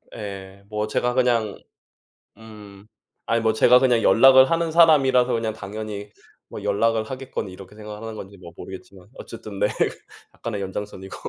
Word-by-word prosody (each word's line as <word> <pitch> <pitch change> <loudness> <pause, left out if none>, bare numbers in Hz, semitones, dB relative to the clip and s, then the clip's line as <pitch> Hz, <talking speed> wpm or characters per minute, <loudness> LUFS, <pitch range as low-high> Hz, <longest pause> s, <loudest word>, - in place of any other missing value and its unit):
예. 100 -2 -8
뭐 105 0 -2
제가 125 +3 -1
그냥 120 -5 +1 0.8
음. 105 -2 -14 0.4
아이 115 0 0
뭐 110 -1 +2
제가 125 +3 +6
그냥 125 -3 +3
연락을 130 +2 +6
하는 165 -1 0
사람이라서 135 -7 +4
그냥 115 -1 -1
당연히 105 0 -7 0.4
뭐 105 - -9
연락을 110 +2 +1
하겠거니 130 -5 -6
이렇게 95 +2 -13
생각을 105 0 -9
하는 110 -1 -7
건지 100 -1 -10
뭐 85 -2 -12
모르겠지만 95 0 -11
어쨌든 105 -3 -9
네. - - +3 0.7
약간의 105 -4 -5
연장선이고. 95 0 -7
110 Hz, 345 characters per minute, -23 LUFS, 100-120 Hz, 0.8 s, 제가